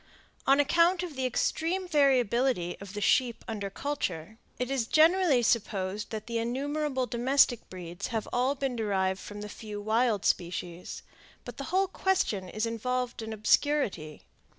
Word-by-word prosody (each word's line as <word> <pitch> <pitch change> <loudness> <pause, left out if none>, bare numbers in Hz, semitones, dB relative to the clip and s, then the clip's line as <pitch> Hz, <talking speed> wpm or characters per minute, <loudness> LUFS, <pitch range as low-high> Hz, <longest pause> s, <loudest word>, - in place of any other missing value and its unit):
On 275 +1 +5
account 340 +5 +3
of 340 -5 -6
the 260 -1 0
extreme 340 +8 -1
variability 255 - +2
of 200 0 -9
the 205 - -3
sheep 240 +2 +2
under 205 -3 -4
culture, 220 - -4 0.2
it 250 +1 -2
is 255 -4 0
generally 320 -4 +4
supposed 205 -3 0
that 215 -2 -5
the 235 -1 -2
innumerable 270 +3 -1
domestic 245 0 +2
breeds 175 -2 -6
have 225 -4 -3
all 255 +3 +2
been 270 -2 -2
derived 195 -4 0
from 205 +1 -8
the 210 - -5
few 210 0 -7
wild 220 0 +1
species; 175 0 -2 0.4
but - - -8
the 275 - -5
whole 380 +3 +1
question 220 - 0
is 215 +3 -2
involved 245 +2 -2
in 220 0 -6
obscurity. 215 - +1
240 Hz, 150 wpm, -29 LUFS, 205-275 Hz, 0.4 s, On